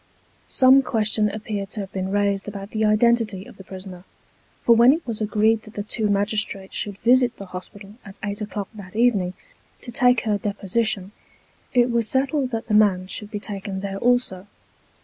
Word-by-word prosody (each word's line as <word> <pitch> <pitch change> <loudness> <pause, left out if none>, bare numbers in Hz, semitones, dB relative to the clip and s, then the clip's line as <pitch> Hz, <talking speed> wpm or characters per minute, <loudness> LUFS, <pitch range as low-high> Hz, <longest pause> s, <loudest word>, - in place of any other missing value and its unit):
Some 260 +1 +6
question 215 -4 0
appeared 205 -2 -5
to 215 -1 -4
have 195 -1 -7
been 190 0 -2
raised 200 0 0
about 200 0 -7
the 220 0 -1
identity 215 -2 +2
of - - -14
the 190 - -11
prisoner; 185 -1 -10 0.6
for 235 - +4
when 240 +4 +7
it 325 +2 -4
was 225 -2 -3
agreed 215 +1 +2
that 215 0 -15
the 205 - -3
two 215 0 -1
magistrates 205 -1 -1
should 200 -2 -3
visit 245 +2 +3
the 200 - -8
hospital 195 +2 -9
at 195 -1 -12
eight 205 +1 -4
o'clock 205 -1 -4
that 200 -1 -11
evening, 210 -6 +2 0.5
to 240 - -7
take 245 0 +3
her 210 -2 0
deposition, 200 0 -1 0.6
it 245 0 +4
was 235 -2 +1
settled 270 0 +1
that 225 -2 -4
the 215 - -3
man 200 -4 +4
should 205 +2 -6
be 210 - -4
taken 200 -2 -5
there 195 0 -4
also. 240 -6 +1
210 Hz, 185 wpm, -23 LUFS, 195-230 Hz, 0.6 s, when